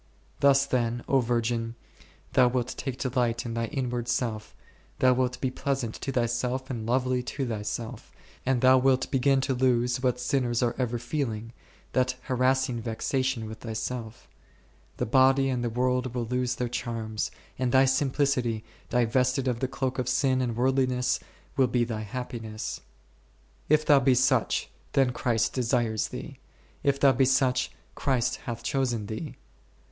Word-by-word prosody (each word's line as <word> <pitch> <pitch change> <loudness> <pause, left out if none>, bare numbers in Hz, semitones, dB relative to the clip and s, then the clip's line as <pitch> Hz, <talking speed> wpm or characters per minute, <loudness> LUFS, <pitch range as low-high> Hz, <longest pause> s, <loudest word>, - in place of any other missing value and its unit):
Thus 140 0 +5
then, 120 -3 -1
O 135 - +4
virgin, 115 -1 -1 0.6
thou 130 -2 +6
wilt 125 0 -1
take 130 -1 -4
delight 125 -3 0
in 115 - -3
thy 115 0 -1
inward 125 -3 -3
self, 115 -3 -2 0.4
thou 130 0 +5
wilt 125 0 0
be 130 - -1
pleasant 130 -4 -2
to 135 - -2
thyself 125 +2 -1
and 115 -3 -4
lovely 125 +1 +1
to 135 +2 -3
thyself, 110 0 -5 0.3
and 130 -2 +1
thou 130 0 +6
wilt 130 0 +2
begin 135 0 +3
to 130 - 0
lose, 125 -1 +2
what 125 -1 +1
sinners 125 -1 0
are 120 -1 +1
ever 120 -2 0
feeling, 115 -3 -3 0.4
that 130 0 +2
harass 130 +1 +2
ing 120 -2 -3
vexation 120 +1 -1
with 110 0 -8
thyself; 115 0 -5 0.7
the - - 0
body 135 +3 +4
and 125 -2 -1
the 120 - 0
world 125 +1 0
will 120 -1 -1
lose 125 +1 -1
their 125 - -2
charms, 115 -2 -3 0.3
and 130 -1 +1
thy 130 +1 +6
simplicity, 130 -4 +1 0.3
divested 125 +2 +2
of 120 -2 0
the 130 - 0
cloak 130 0 -2
of 125 -1 -1
sin 130 -2 +2
and 120 -3 -1
worldliness, 130 0 +1 0.4
will 135 -3 +4
be 120 0 +1
thy 115 -2 -3
happiness. 110 -1 -5 0.9
If 155 +1 +4
thou 145 -2 +6
be 130 -1 +4
such, 130 -1 +2 0.3
then 135 -2 +3
Christ 115 -2 0
desires 120 -3 0
thee; - - -8 0.4
if 140 -1 +1
thou 140 -1 +6
be 130 +1 +3
such, 130 -1 +2 0.2
Christ 130 -4 0
hath 120 -3 -5
chosen 125 -6 0
thee. 110 +9 -6
125 Hz, 160 wpm, -27 LUFS, 120-130 Hz, 0.9 s, thou